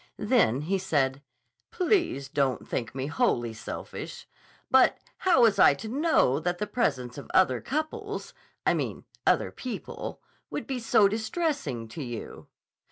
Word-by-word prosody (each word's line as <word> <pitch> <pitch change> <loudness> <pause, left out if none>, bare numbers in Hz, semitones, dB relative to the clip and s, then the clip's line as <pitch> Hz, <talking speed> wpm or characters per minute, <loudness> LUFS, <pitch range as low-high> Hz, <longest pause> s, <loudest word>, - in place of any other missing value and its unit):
Then 210 - +3
he 190 +6 0
said: 140 -7 0 0.5
"Please 350 - +1
don't 140 -2 0
think 115 +1 -3
me 135 0 -2
wholly 120 -5 +1
selfish. 110 - -7 0.4
But 260 0 +6 0.2
how 345 -10 +4
was 210 -4 +4
I 140 - +7
to 180 - -7
know 260 - +2
that 175 +2 -1
the 210 - -2
presence 135 - -1
of - - -11
other 130 -10 +4
couples—I 410 +9 -3
mean - - -3 0.2
other - - +3
people—would 255 -2 -7
be 265 -3 -3
so 215 -3 +4
distressing 220 - -2
to 150 - -7
you?" 120 -4 -7
185 Hz, 135 wpm, -28 LUFS, -, 0.5 s, I